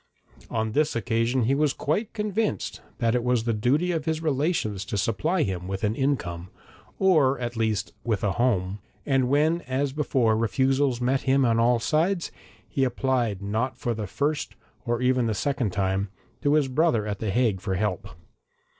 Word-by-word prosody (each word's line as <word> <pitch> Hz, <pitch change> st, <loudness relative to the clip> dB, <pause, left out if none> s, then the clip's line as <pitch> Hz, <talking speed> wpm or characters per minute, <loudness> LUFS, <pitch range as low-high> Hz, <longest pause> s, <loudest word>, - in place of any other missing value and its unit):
On 110 Hz, -1 st, -1 dB
this 150 Hz, +6 st, +1 dB
occasion 115 Hz, +2 st, +1 dB
he 125 Hz, +5 st, +2 dB
was 150 Hz, 0 st, +2 dB
quite 205 Hz, +10 st, -1 dB
convinced 210 Hz, 0 st, -2 dB, 0.2 s
that 115 Hz, -2 st, +1 dB
it 125 Hz, -1 st, +1 dB
was 125 Hz, -2 st, +1 dB
the 115 Hz, 0 st, 0 dB
duty 140 Hz, +11 st, +1 dB
of 160 Hz, -3 st, -2 dB
his 160 Hz, -1 st, 0 dB
relations 145 Hz, -, 0 dB
to 100 Hz, -, -3 dB
supply 155 Hz, -, +1 dB
him 90 Hz, -3 st, -3 dB
with 95 Hz, +1 st, -4 dB
an 105 Hz, 0 st, +2 dB
income, 100 Hz, -10 st, -2 dB, 0.5 s
or 155 Hz, -8 st, +4 dB
at 120 Hz, -1 st, -4 dB
least 110 Hz, -3 st, -1 dB
with 110 Hz, -5 st, -1 dB
a 105 Hz, -, +2 dB
home, 100 Hz, -5 st, 0 dB, 0.3 s
and 135 Hz, -3 st, +2 dB
when 155 Hz, +5 st, +2 dB
as 130 Hz, +1 st, -1 dB
before 130 Hz, -6 st, +2 dB
refusals 130 Hz, +3 st, +1 dB
met 130 Hz, +2 st, +1 dB
him 135 Hz, 0 st, +4 dB
on 115 Hz, -1 st, +2 dB
all 120 Hz, +1 st, +4 dB
sides, 165 Hz, +9 st, 0 dB, 0.4 s
he 135 Hz, -, -1 dB
applied 125 Hz, -5 st, 0 dB
not 110 Hz, +6 st, -1 dB
for 120 Hz, -, -1 dB
the 110 Hz, -2 st, -4 dB
first 145 Hz, +9 st, -2 dB, 0.3 s
or 120 Hz, +1 st, 0 dB
even 125 Hz, -1 st, +2 dB
the 110 Hz, -, 0 dB
second 135 Hz, -1 st, 0 dB
time, 95 Hz, +1 st, 0 dB, 0.3 s
to 145 Hz, 0 st, +3 dB
his 150 Hz, -3 st, +3 dB
brother 130 Hz, -5 st, +2 dB
at 100 Hz, -2 st, -3 dB
the 110 Hz, -, -2 dB
Hague 110 Hz, -3 st, +1 dB
for 95 Hz, -2 st, -2 dB
help. 105 Hz, +1 st, -1 dB
125 Hz, 180 wpm, -26 LUFS, 110-145 Hz, 0.5 s, or